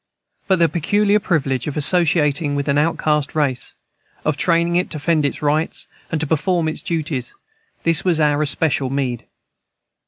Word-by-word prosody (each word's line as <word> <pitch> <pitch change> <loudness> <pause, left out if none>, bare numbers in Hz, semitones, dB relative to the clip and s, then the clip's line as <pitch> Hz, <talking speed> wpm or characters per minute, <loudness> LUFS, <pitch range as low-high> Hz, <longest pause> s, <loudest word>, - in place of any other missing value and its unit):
But 190 - +3
the 170 -1 +4
peculiar 205 +5 +2
privilege 135 - -1
of 150 - -4
associating 150 -2 +2
with 140 0 -2
an 140 0 +2
outcast 150 -2 0
race, 140 -5 -1 0.5
of 155 - +1
training 170 +1 +1
it 180 +1 +2
to - - -6
defend 155 0 +1
its 140 - -3
rights 150 +2 0 0.3
and 160 - 0
to 160 - 0
perform 165 +2 0
its 155 - -3
duties, 155 -7 -3 0.5
this 165 -2 +2
was 175 -4 +1
our 150 -1 +2
especial 145 -2 0
meed. 130 -4 -3
155 Hz, 160 wpm, -20 LUFS, 145-170 Hz, 0.5 s, the